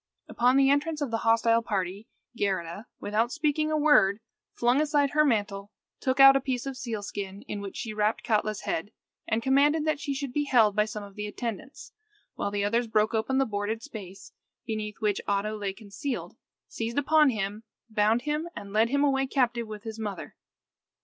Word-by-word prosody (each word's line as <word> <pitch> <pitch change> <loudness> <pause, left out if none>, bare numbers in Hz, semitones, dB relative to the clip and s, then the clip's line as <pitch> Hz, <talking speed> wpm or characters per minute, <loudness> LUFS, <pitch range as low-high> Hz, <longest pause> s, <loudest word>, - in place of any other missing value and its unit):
Upon 250 +2 +3
the 275 0 +5
entrance 300 +2 0
of 285 -5 -2
the 225 - 0
hostile 230 0 +3
party, 200 -1 -3 0.3
Geirrida, 195 0 -2
without 220 +4 0
speaking 310 0 0
a 310 - +2
word, 290 -10 +4 0.3
flung 245 +4 +2
aside 290 -2 +2
her 305 +2 +4
mantle, 205 -6 0 0.3
took 260 0 -1
out 270 0 +10
a 275 - +2
piece 255 -2 -2
of 270 -1 -4
sealskin, 205 -5 -5
in 205 - -5
which 200 -1 -7
she 220 -3 -4
wrapped 215 +1 0
up - - -14
Katla's 215 -1 0
head, 200 +6 -3 0.4
and 225 +1 0
commanded 290 +4 +3
that 310 -2 0
she 280 -1 -3
should 270 -2 -4
be 290 +1 0
held 225 -7 +4
by 210 0 +3
some 210 -1 -6
of 200 -1 -11
the 210 +1 -5
attendants, 230 +4 -6 0.4
while - - -2
the 200 0 -1
others 230 +3 +1
broke 215 +1 +1
open 225 +4 0
the 270 - +3
boarded 215 +1 -3
space, 195 -4 -10 0.3
beneath 215 -2 -4
which 210 -2 0
Oddo 205 +2 0
lay 205 -2 -3
concealed, 215 +6 -6 0.3
seized 230 +2 -4
upon 300 +1 +4
him, 210 -2 -3 0.3
bound 220 +2 +2
him, 300 +3 -2
and 200 0 -8
led 220 +2 +3
him 280 +2 +2
away 270 -1 +2
captive 245 -4 0
with 210 -1 -8
his 225 -1 -7
mother. 205 -5 -5
225 Hz, 190 wpm, -27 LUFS, 210-270 Hz, 0.4 s, out